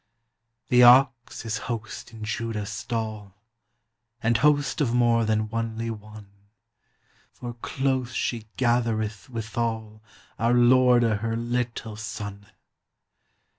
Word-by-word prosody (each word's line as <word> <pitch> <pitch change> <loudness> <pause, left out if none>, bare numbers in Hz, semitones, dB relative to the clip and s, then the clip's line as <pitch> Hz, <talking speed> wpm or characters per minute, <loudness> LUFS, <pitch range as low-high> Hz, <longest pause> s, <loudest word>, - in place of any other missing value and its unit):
The 125 0 +5
Ox 125 -1 +5
is 110 -1 -2
host 110 -1 -5
in 110 -2 -10
Juda's 110 -1 -3
stall, 110 -4 -4 0.9
And 115 0 +3
Host 145 +3 +2
of 120 -4 +1
more 120 -1 +3
than 110 0 0
onelie 115 0 -3
one, 105 -1 -11 1.0
For 120 -1 -7
close 130 +1 -2
she 115 -2 -2
gathereth 115 -3 0
withal 110 -2 -4 0.4
Our 115 +2 +3
Lorde 125 0 +5
her 115 0 0
littel 120 -2 -3
Sonne. 105 -2 -7
115 Hz, 105 wpm, -25 LUFS, 110-120 Hz, 1.0 s, The